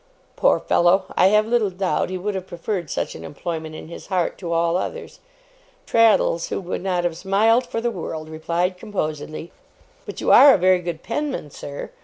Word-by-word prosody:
Poor - - +3
fellow! 185 +2 +3
I 185 - +5
have 210 +2 +4
little 225 -2 +1
doubt 185 -1 -1
he 185 - -3
would 205 +3 -3
have 190 -1 -5
preferred 175 -1 -4
such - - -3
an - - -10
employment 160 0 -6
in - - -9
his 170 - -10
heart 185 -3 0
to 170 -3 -5
all 170 0 +1
others. 470 - -4 0.7
Traddles, 225 -7 +3
who - - -2
would 180 -2 -5
not 180 -2 -1
have 175 -2 -1
smiled 220 +7 +2
for 230 - -3
the 240 0 0
world, 160 -5 -6
replied 170 +3 -2
composedly: 155 -6 -5 0.6
'But - - -7
you - - +1
are 280 -2 +9
a - - +1
very 185 0 +4
good 170 -2 -6
penman, 270 - -3
sir. 140 0 -8
180 Hz, 190 wpm, -22 LUFS, 170-210 Hz, 0.7 s, are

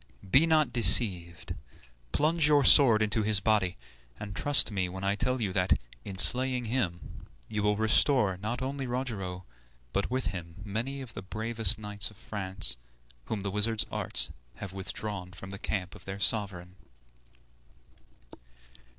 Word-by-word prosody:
Be 135 - +4
not 155 -6 +2
deceived, 90 -8 +5 0.6
plunge 155 0 +1
your 145 -2 +3
sword 115 -8 +6
into 110 +1 0
his 105 -1 +2
body, 95 -3 0 0.4
and 100 -2 -8
trust 145 -3 +2
me 95 -3 -2
when 95 +2 -8
I 100 0 +1
tell 125 +5 -2
you 100 -5 -3
that, 90 -5 +1 0.2
in 95 +4 -8
slaying 125 +4 +6
him, 105 -8 -4 0.2
you 105 -1 -4
will 105 0 0
restore 110 -1 +2
not 110 +6 -4
only 135 0 -4
Rogero, 100 -8 -5 0.5
but 100 - -1
with 130 +1 -2
him 85 -3 -8
many 120 +7 -4
of 125 -3 -9
the - - -7
bravest 110 +1 -1
knights 105 -1 -5
of 110 - -19
France, 95 - -1 0.5
whom 110 -3 -4
the 100 0 -4
wizard's 105 +2 0
arts - - -2 0.2
have 95 -1 -8
withdrawn 95 -1 -6
from 95 +2 -10
the 100 - -8
camp 90 -5 -4
of - - -15
their 95 +1 -7
sovereign." 95 -4 -1
105 Hz, 150 wpm, -28 LUFS, 95-120 Hz, 0.6 s, sword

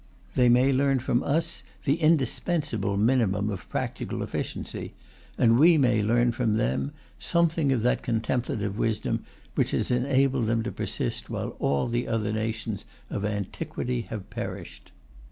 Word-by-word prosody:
They 125 -1 +4
may 125 +3 +5
learn 135 0 +3
from 120 0 +1
us 165 +3 -1 0.2
the 140 +1 +3
indispensable 155 - +1
minimum 105 -2 +2
of 95 -3 -7
practical - - -3
efficiency, - - -5 0.4
and 115 +1 +4
we 165 +2 +7
may 120 -6 +3
learn 120 +3 +3
from 115 -2 0
them 70 - 0 0.3
something 165 -4 +2
of 120 -4 +1
that 125 - +2
contemplative 110 -3 -1
wisdom 115 -1 0 0.3
which - - +1
has - - -1
enabled 130 -1 +2
them 115 0 +1
to 120 - -3
persist - - -3
while - - -4
all 70 -1 +1
the 120 +1 -1
other 110 -2 0
nations 110 -1 -3 0.3
of 100 - -2
antiquity 105 +4 -2
have 105 -4 -6
perished. - - -7
120 Hz, 145 wpm, -27 LUFS, 110-135 Hz, 0.4 s, we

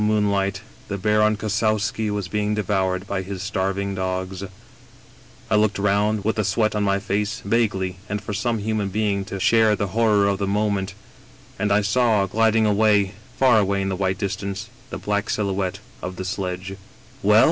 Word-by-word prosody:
moonlight, 100 -2 +1 0.3
the 100 - -3
Baron 105 +2 +2
Kossowski 110 0 0
was 105 -2 -2
being 105 +1 -1
devoured 95 -2 0
by 100 -1 -2
his 95 0 -6
starving 100 -1 -1
dogs, 95 0 -3 0.5
" - - -25
I - - +4
looked 105 -2 +2
round, 105 +1 +1
with 110 +1 0
the 110 - +2
sweat 110 +3 +1
on 105 - 0
my 100 -1 +2
face, 100 +1 -2
vaguely, 100 -4 0 0.2
for 105 +1 -5
some 115 +3 0
human 105 -1 -1
being 100 -1 0
to 100 -1 -5
share 110 +1 +4
the 100 -1 -2
horror 110 -3 +3
of 100 -1 0
the 100 - -1
moment, 100 -1 0 0.6
and 105 0 +1
I 105 +1 +4
saw, 110 -1 +3
gliding 110 +2 +2
away, 105 -2 +3 0.2
far 125 -4 +5
away 100 -1 +1
in 95 - -1
the 95 - -1
white 95 0 0
distance, 100 +2 -4 0.2
the - - -5
black 105 0 -1
silhouette 95 -3 -1 0.2
of 90 0 -5
the 95 - -5
sledge." 95 0 -4 0.2
" - - -25
Well - - +5
100 Hz, 180 wpm, -23 LUFS, 95-105 Hz, 0.6 s, far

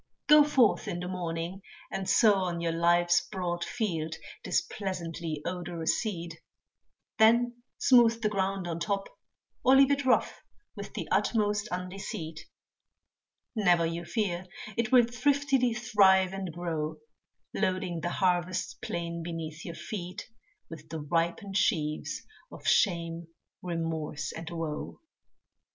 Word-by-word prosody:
Go 300 0 +8
forth 265 -6 +3
in 175 - -3
the 180 - -4
morning, 175 0 -4 0.3
and 190 -1 -3
sow 220 -3 +6
on 175 -2 -2
your 170 0 0
life's 175 +1 +3
broad 175 -3 -2
field 165 -9 -2 0.3
This - - +2
pleasantly 170 -5 -4
odorous 175 -1 -1
seed, 170 -7 -5 0.8
then 240 +2 +4 0.2
smooth 235 -3 +5
the 220 - +1
ground 195 -2 -1
on 170 -1 -3
top, 195 +1 -2 0.5
Or 260 - +6
leave 275 +1 +6
it 280 0 +1
rough, 255 - +2 0.3
with - - -8
the - - -4
utmost 210 -1 +1
undeceit, 180 -3 -5 1.2
Never 175 -6 +4
you 165 +1 -3
fear, 185 -2 -2 0.3
it 235 0 -1
will 250 -2 +7
thriftily 270 0 +1
thrive 190 -5 +4
and 190 -2 -4
grow, 160 -2 -3 0.6
Loading 185 -2 -1
the 175 - -1
harvest 180 -1 0
plain 170 0 -4
beneath 165 -1 -6
your 170 - -6
feet, 185 -1 -6 0.4
With 160 -1 -11
the 160 0 -4
ripened 170 +6 -1
sheaves 155 -5 0 0.3
of - - -11
shame, 170 -3 +2 0.3
remorse, 165 -3 -3
and 165 0 -7
woe. 165 -3 -5
180 Hz, 130 wpm, -29 LUFS, 165-210 Hz, 1.2 s, Go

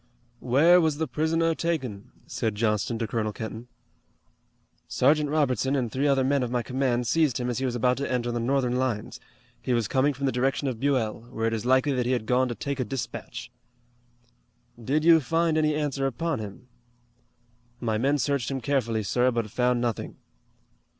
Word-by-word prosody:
"Where 160 +8 +5
was 155 -3 +1
the 160 0 -1
prisoner 160 +5 +1
taken?" 130 -11 -3 0.2
said 110 -3 -2
Johnston 105 +1 0
to 115 -1 -2
Colonel 110 -1 -1
Kenton. 110 +2 -7 1.2
"Sergeant 150 +3 +2
Robertson 140 -3 +1
and 125 -5 -1
three 140 +3 0
other 135 -2 +3
men 140 +1 +2
of 125 - -1
my 120 -1 -1
command 125 -2 0
seized 150 0 +2
him 125 0 -1
as 120 - -3
he 135 - -1
was 125 -2 -1
about 125 +1 +2
to 140 -1 -3
enter 120 -1 -1
the 120 - -2
Northern 125 0 0
lines. 125 -5 -2 0.4
He 125 - -1
was 115 -3 +1
coming 140 +4 +1
from 140 +1 -3
the 135 - +2
direction 135 +3 0
of 125 -4 -3
Buell, 125 -6 0
where 115 -2 -3
it 115 - 0
is 115 +2 -3
likely 130 +2 +3
that 125 -2 0
he 130 - +2
had 120 -3 -1
gone 125 +2 +2
to 120 - -4
take 140 +2 -4
a - - +1
dispatch." 125 +2 -6 1.3
"Did 145 +6 +1
you 165 -1 +7
find 165 +3 +1
any 155 -1 +2
answer 145 -2 -1
upon 160 +3 -2
him." 105 +3 -9 1.1
"My 110 -3 -1
men 140 +4 +2
searched 140 -2 -1
him 135 -1 -2
carefully, 115 -4 0
sir, 125 +6 +2
but 115 -4 -2
found 125 0 +1
nothing." 120 -3 -3
130 Hz, 190 wpm, -26 LUFS, 120-140 Hz, 1.3 s, you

